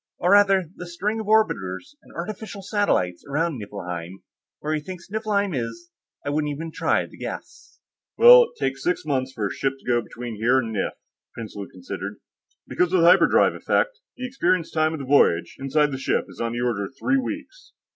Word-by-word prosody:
"Or, 180 - +1
rather, 195 -3 +5
the 180 - -7
string 200 +6 -2
of 220 - -5
orbiters 215 - +1
and - - -19
artificial 200 +2 -6
satellites 190 - 0
around 155 -1 -1
Niflheim. 90 -3 -7 0.4
Where 155 +1 -2
he 155 - 0
thinks 175 +3 -9
Niflheim 205 -3 0
is, 135 +8 -5 0.3
I 145 - -1
wouldn't 150 0 0
even 160 +3 -5
try - - +1
to - - -15
guess." - - -8 0.4
"Well, 485 +1 +9
it 470 0 -16
takes - - -2
six 345 - 0
months 130 -3 -1
for 110 -5 -3
a 100 - -2
ship 135 -1 -1
to - - -23
go 120 -1 +2
between 120 -1 -7
here 120 +5 +3
and 115 -4 -1
Nif," - - -1 0.4
Prinsloo 105 -3 -7
considered. 90 -1 -6 0.5
"Because 180 -1 +1
of 185 - +4
the - - +5
hyperdrive 175 - +5
effects, - - 0 0.2
the 255 - -4
experienced 185 -9 0
time 155 0 +2
of 160 - -5
the 135 - -5
voyage, 85 -11 +3
inside 145 +2 +1
the 130 - -4
ship, - - 0
is - - -9
of 115 0 -1
the 120 +1 -3
order 115 -5 0
of 135 - -11
three 275 -1 +2
weeks. - - -7
155 Hz, 195 wpm, -24 LUFS, 120-200 Hz, 0.5 s, Well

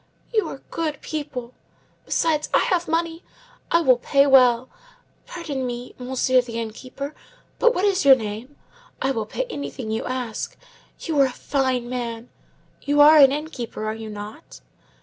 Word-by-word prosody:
You 435 -2 +2
are - - -8
good 310 -4 -2
people. 280 -6 -5 0.5
Besides, 310 -2 +1
I - - +5
have 350 -1 +1
money. 330 +1 -1 0.5
I 335 - +4
will 255 -6 +4
pay 275 +2 +3
well. 255 -3 +5 0.6
Pardon 300 -6 -4
me, 245 0 -5
monsieur 255 0 +2
the 230 -2 -6
inn 225 -1 -4
keeper, 275 +5 -7 0.5
but 480 0 +4
what 380 - +1
is 390 -3 +2
your 275 -1 +9
name? 225 +4 -6 0.4
I 265 - 0
will 225 -5 -3
pay - - -2
anything 280 - -5
you 220 - -2
ask. 250 -4 -4 0.4
You 315 -4 -1
are 275 - +6
a - - -5
fine 260 -2 -1
man. 240 -1 -5 0.5
You 290 +1 0
are 300 +1 +9
an 270 -2 +8
inn 300 +2 -3
keeper, 235 -5 -6
are 215 - -1
you 220 0 -7
not?" 210 +8 -9
265 Hz, 170 wpm, -23 LUFS, 240-300 Hz, 0.6 s, your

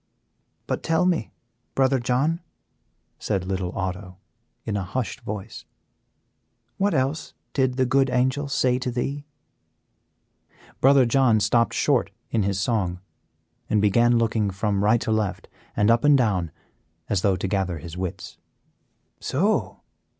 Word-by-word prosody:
"But - - -2
tell 165 +2 +1
me, 175 -10 0 0.4
Brother 135 0 +3
John," 130 +7 0 0.8
said 95 -4 -2
little 95 -1 -2
Otto, 95 -1 -4 0.5
in 105 - -2
a 100 - -1
hushed 115 +6 -4
voice, 105 +1 -7 1.1
"what 200 +1 +1
else 135 +4 -1 0.2
did 130 -2 +1
the 130 - +3
good 135 +1 +2
Angel 130 +3 +1
say 130 -2 +1
to 125 - -2
thee?" 140 +4 -3 1.5
Brother 135 -1 +5
John 120 -2 +3
stopped 115 +3 +2
short - - +2 0.2
in 115 - +1
his 100 -1 0
song 100 -5 -1 0.7
and 110 - +2
began 120 +4 +4
looking 110 -2 +1
from 100 +1 -1
right 110 +3 +4
to - - -2
left, 105 -4 -1 0.3
and 105 +2 +4
up 115 +3 +3
and 145 -1 +6
down, 100 -9 +1 0.6
as 100 -4 0
though 100 -1 +2
to 95 +2 -3
gather 95 -3 -1
his 80 +2 -9
wits. 90 -1 -6 0.8
"So!" 200 +11 0
115 Hz, 135 wpm, -24 LUFS, 100-130 Hz, 1.5 s, and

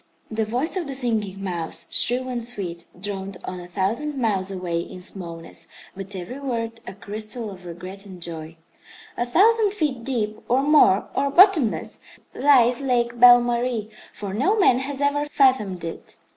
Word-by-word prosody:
The 220 0 0
voice 250 - -1
of 355 -5 -2
the 275 - -3
Singing 215 -6 -1
Mouse, 175 -4 -2
shrill 250 +2 +2
and 245 -2 -3
sweet, 185 -8 -4
droned 195 -1 -5
on 185 - -5
a 175 - -9
thousand 230 +12 -2
miles 200 -6 0
away 180 -3 -2
in 175 +2 -7
smallness, 170 -3 -6 0.3
but 195 +1 -6
every 185 +9 -6
word 230 -4 -3
a - - -7
crystal 215 +2 -6
of 185 -2 -12
regret 185 +4 -9
and 185 -2 -11
joy. 165 -1 -6 0.6
"A 240 - -2
thousand 415 - +4
feet 295 - -2
deep, 220 -4 -2
or 255 +3 +3
more, 285 -10 +5
or 280 +1 0
bottomless, 340 - +4 0.3
lies 250 -3 +4
Lake 240 -3 0
Belle 245 0 +9
Marie, 240 -2 -1 0.2
for 200 -2 -6
no 290 - +1
man 255 - +4
has 275 +1 -4
ever 285 +1 +1
fathomed 255 - +2
it. 165 - -7
230 Hz, 165 wpm, -23 LUFS, 190-265 Hz, 0.6 s, Belle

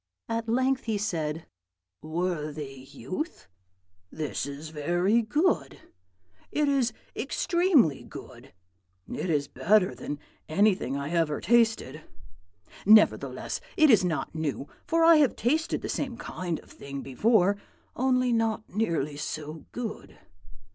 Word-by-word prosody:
At 225 0 -2
length 260 +2 +1
he 220 -2 0
said, 165 -6 -2 0.6
'Worthy 155 -5 -4
youth, 245 - -6 0.6
this 150 +1 -3
is 145 +2 -7
very 175 +9 +1
good; 225 - 0 0.7
it 300 -1 +1
is 270 -4 +2 0.2
extremely 340 - +2
good; - - -11 0.6
it 180 - -4
is 145 -3 +1
better 200 0 +2
than 145 - -5 0.3
anything 185 -5 +2
I 140 +2 -4
ever 165 -4 +1
tasted. 230 -1 +2 0.8
Nevertheless, 215 +1 +4 0.2
it 310 -4 +6
is 210 -4 +6
not 175 -3 -2
new; 150 -3 -3 0.2
for 330 0 +3
I 330 -1 +8
have 285 -5 +3
tasted 310 +7 0
the - - -2
same 255 -4 -3
kind 175 -7 -4
of - - -20
thing 140 -1 -7
before, 200 - +3 0.4
only 255 -1 +2
not 225 -1 0
nearly 165 -9 -1
so 155 +1 -6
good. 235 -3 -6
195 Hz, 120 wpm, -27 LUFS, 155-240 Hz, 0.8 s, I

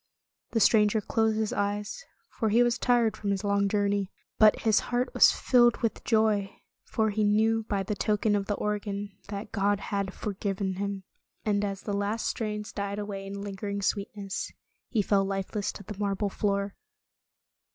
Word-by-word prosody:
The 225 - +3
stranger 210 0 +4
closed 220 +1 +1
his 220 -1 0
eyes, 205 - -2 0.2
for 220 - -2
he 235 +3 +5
was 240 0 +1
tired 235 -3 +3
from 205 - -4
his 195 0 0
long 200 -1 +2
journey. 200 -1 +1 0.3
But 215 -1 +6
his 220 -2 +4
heart 245 +1 0
was - - +7
filled 240 -2 +4
with 230 - -1
joy, 215 -3 +1 0.3
for 220 -2 0
he 215 +1 0
knew 220 +2 +2
by 200 -2 0
the 200 - -2
token 210 0 +1
of 200 -1 -1
the 205 - 0
organ 205 -1 -3 0.2
that 200 +1 -6
God 205 -1 +1
had 200 -1 -2
forgiven 195 -2 -3
him. 200 -1 -3 0.4
And 205 -1 +1
as 195 -1 -3
the 205 - -3
last 205 +3 -1
strains 210 -2 -3
died 200 0 -3
away 200 -2 -5
in 200 0 -6
lingering 200 0 -4
sweetness, 200 -1 -2 0.4
he 220 -5 +1
fell 195 0 +3
lifeless 195 +1 -2
to 200 - -10
the 210 - -7
marble 200 0 0
floor. 200 0 -1
205 Hz, 170 wpm, -28 LUFS, 200-215 Hz, 0.4 s, was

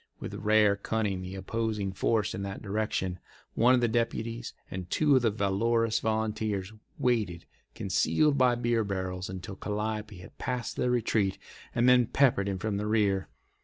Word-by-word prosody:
With - - -6
rare 105 -1 +3
cunning 100 -2 -2
the 95 +1 -6
opposing 105 0 -2
force 105 +2 0
in - - -4
that 100 +2 -5
direction—one 105 +3 0
of 125 - +1
the 120 - +3
deputies 115 0 -2 0.2
and 90 -1 -5
two 145 +3 +3
of 130 - +4
the 115 - +3
valorous 110 +3 +1
volunteers— 110 -2 -1 0.2
waited, 105 -9 0 0.3
concealed 140 +10 +2
by 130 -3 +4
beer 120 -1 +1
barrels, 95 -2 -3
until 95 +1 -6
Calliope 105 0 -3
had 90 - -13
passed 125 -2 -3
their 125 - 0
retreat, 110 -5 +1 0.4
and 120 +1 +3
then 125 -2 +6
peppered 120 -9 +3
him 95 - -2
from 100 +1 -2
the 105 +1 -2
rear. 100 -6 +1
110 Hz, 160 wpm, -29 LUFS, 95-115 Hz, 0.4 s, then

